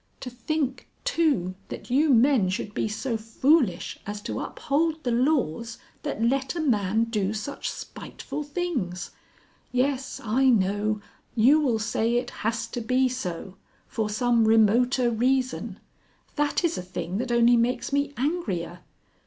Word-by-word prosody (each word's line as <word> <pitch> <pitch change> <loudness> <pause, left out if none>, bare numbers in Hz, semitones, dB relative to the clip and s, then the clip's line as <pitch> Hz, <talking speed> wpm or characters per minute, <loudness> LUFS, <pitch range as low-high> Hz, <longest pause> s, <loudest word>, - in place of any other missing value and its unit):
"To 250 - -6
think, 265 +2 -3 0.2
too, 300 - +1 0.2
that - - -8
you 290 +4 +4
men 245 -5 +4
should 210 +2 -3
be - - -1
so 225 +3 -2
foolish 225 - +1
as 205 0 -4
to - - -3
uphold 315 +2 -1
the 245 - 0
laws 235 - 0 0.2
that 225 - -3
let 265 +5 +1
a - - -2
man 220 - +2
do 215 -3 -1
such 220 +7 -4
spiteful - - -7
things. 290 - -3 0.6
Yes 265 +1 -1
I 255 +4 +3
know; 205 -1 +1 0.3
you 255 +7 +6
will 255 -7 +2
say 225 +2 0
it 245 - -1
has 225 +1 -1
to 240 - -4
be 255 +3 +2
so. 190 -6 -5 0.3
For 220 -2 -2
some 235 +1 +2
remoter 235 +3 +4
reason. 250 -3 0 0.6
That 295 +3 +1
is 335 -1 +1
a - - -3
thing 180 +1 -4
that 250 0 -2
only 235 0 +5
makes 240 +3 0
me 285 0 +1
angrier. 215 - -2
240 Hz, 145 wpm, -26 LUFS, 215-270 Hz, 0.6 s, you